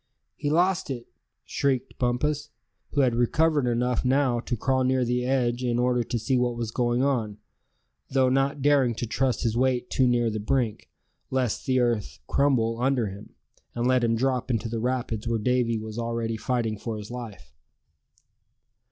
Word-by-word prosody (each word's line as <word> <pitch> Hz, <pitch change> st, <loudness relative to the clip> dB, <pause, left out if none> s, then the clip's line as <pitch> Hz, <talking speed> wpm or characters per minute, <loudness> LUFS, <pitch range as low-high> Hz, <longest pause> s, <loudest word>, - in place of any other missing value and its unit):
"He 145 Hz, -, -2 dB
lost 175 Hz, +2 st, +2 dB
it!" 120 Hz, -3 st, -4 dB, 0.4 s
shrieked 135 Hz, -3 st, -1 dB
Bumpus, 145 Hz, +4 st, 0 dB, 0.4 s
who 145 Hz, -, +3 dB
had 125 Hz, -3 st, +3 dB
recovered 145 Hz, +4 st, +2 dB
enough 120 Hz, 0 st, 0 dB
now 130 Hz, -2 st, +2 dB
to 120 Hz, 0 st, -3 dB
crawl 130 Hz, +3 st, +1 dB
near 130 Hz, 0 st, +2 dB
the 125 Hz, +1 st, 0 dB
edge 125 Hz, -2 st, +1 dB
in 120 Hz, -1 st, 0 dB
order 125 Hz, 0 st, +2 dB
to 120 Hz, -, -2 dB
see 130 Hz, +4 st, 0 dB
what 120 Hz, -1 st, 0 dB
was 115 Hz, -2 st, -3 dB
going 120 Hz, +1 st, +1 dB
on; 115 Hz, -7 st, 0 dB, 0.7 s
though 130 Hz, -1 st, +3 dB
not 135 Hz, +1 st, +1 dB
daring 140 Hz, -5 st, +3 dB
to 120 Hz, -, -3 dB
trust 130 Hz, +3 st, 0 dB
his 115 Hz, -2 st, 0 dB
weight 125 Hz, 0 st, +1 dB
too 130 Hz, -, +3 dB
near 120 Hz, -2 st, +2 dB
the 110 Hz, -, -3 dB
brink, 115 Hz, 0 st, -1 dB, 0.4 s
lest 130 Hz, -4 st, -1 dB
the 130 Hz, -1 st, +3 dB
earth 110 Hz, -, 0 dB
crumble 120 Hz, -, +1 dB
under 125 Hz, -5 st, +1 dB
him, 100 Hz, +2 st, -11 dB, 0.4 s
and 120 Hz, 0 st, -1 dB
let 130 Hz, -1 st, +3 dB
him 115 Hz, -1 st, +2 dB
drop 130 Hz, +1 st, 0 dB
into 115 Hz, -2 st, 0 dB
the 115 Hz, 0 st, -3 dB
rapids 120 Hz, -2 st, -2 dB
where 115 Hz, 0 st, +1 dB
Davy 120 Hz, 0 st, +1 dB
was 110 Hz, +1 st, -6 dB
already 115 Hz, -1 st, -2 dB
fighting 110 Hz, -1 st, -1 dB
for 110 Hz, 0 st, -4 dB
his 105 Hz, +2 st, -8 dB
life. 105 Hz, -, -8 dB
125 Hz, 175 wpm, -26 LUFS, 115-130 Hz, 0.7 s, who